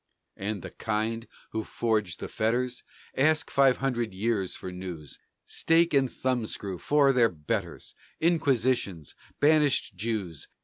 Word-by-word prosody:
And 100 -1 -4
the - - -7
kind 115 +1 -2 0.2
who 110 - -2
forged 105 -8 -1
these - - -6
fetters? 120 +3 0 0.3
Ask 155 +3 +2
five 135 -2 +4
hundred 120 -6 -1
years 100 -2 -1
for 95 - -7
news. 90 -5 -8 0.3
Stake 165 0 +2
and 135 -2 +3
thumbscrew 110 -7 -2
for 145 -2 +4
their 120 -3 +4
betters! 75 -4 -4 0.3
Inquisitions! 130 - +1 0.3
Banished 145 -8 +3
Jews! 95 -6 -3
115 Hz, 125 wpm, -28 LUFS, 100-135 Hz, 0.3 s, five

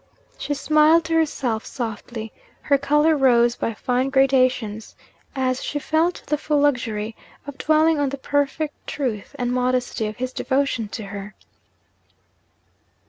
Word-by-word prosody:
She 290 - -2
smiled 305 +3 +4
to 330 - -2
herself 275 -8 0
softly, 225 -1 -6 0.3
her 280 -1 +2
colour 295 +3 +3
rose 240 -4 +4
by 230 - -3
fine 250 +3 0
gradations, 255 -5 +1 0.4
as 260 -1 0
she 295 - -3
felt 320 +4 0
the 300 0 -1
full 300 -1 +1
luxury 230 -6 0 0.3
of 285 -1 -9
dwelling 315 0 +3
on 285 -1 +1
the 280 - -5
perfect 285 +2 -1
truth 250 -3 -4
and 245 -2 -1
modesty 250 -2 0
of 215 - -7
his 255 +1 -4
devotion 265 -5 0
to 215 +2 -6
her. 200 +1 -8
265 Hz, 140 wpm, -22 LUFS, 235-290 Hz, 0.4 s, smiled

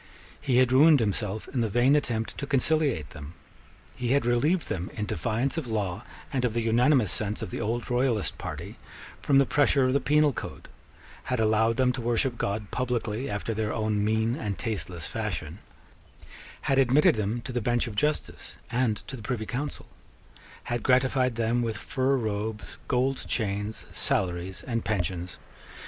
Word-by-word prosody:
He 135 -4 +1
had 130 -1 +4
ruined 145 +3 +7
himself 105 -1 -2
in 125 - -1
the 115 - 0
vain 120 +6 +4
attempt 115 -6 -1
to 140 - -4
conciliate 140 - +1
them. 75 0 -10 0.6
He 125 +1 0
had 140 -3 +2
relieved 145 +9 +2
them, 90 +1 -3
in 105 - -2
defiance 115 - -1
of 145 - -7
law 105 -2 -2 0.3
and 130 -2 0
of 120 -2 0
the 115 - +1
unanimous 120 - +3
sense 105 0 -2
of - - -6
the - - -4
old 115 +2 -2
royalist 120 -7 0
party, - - -7 0.4
from 140 - +3
the 140 - +6
pressure 140 -1 +3
of 130 - +2
the 140 - +3
penal 150 -1 +3
code; - - -7 0.6
had 125 -2 -1
allowed 110 +1 +2
them 130 -1 +3
to 125 0 -4
worship 120 +2 +1
God 100 0 -2
publicly 125 -1 -2
after 105 +2 -2
their 110 0 -1
own 110 -1 0
mean 110 +2 +1
and 100 -3 -3
tasteless 90 -7 -4
fashion; 95 -6 -4 1.0
had 135 0 +2
admitted 135 +3 +5
them 110 +2 -1
to 130 - -6
the 120 -1 -1
bench 120 +2 +1
of 115 - -6
justice 150 +8 -2 0.2
and 120 -3 0
to - - -5
the 120 - -9
Privy 110 0 -3
Council; 140 +6 -4 0.8
had 120 -1 -2
gratified 130 -1 +2
them 115 +1 +1
with 115 -3 -2
fur 135 +4 0
robes, 110 -1 -4
gold 130 +1 0
chains, 105 -1 -2
salaries, 90 0 -1
and 115 -3 -2
pensions. 90 -4 -2
115 Hz, 170 wpm, -27 LUFS, 105-130 Hz, 1.0 s, ruined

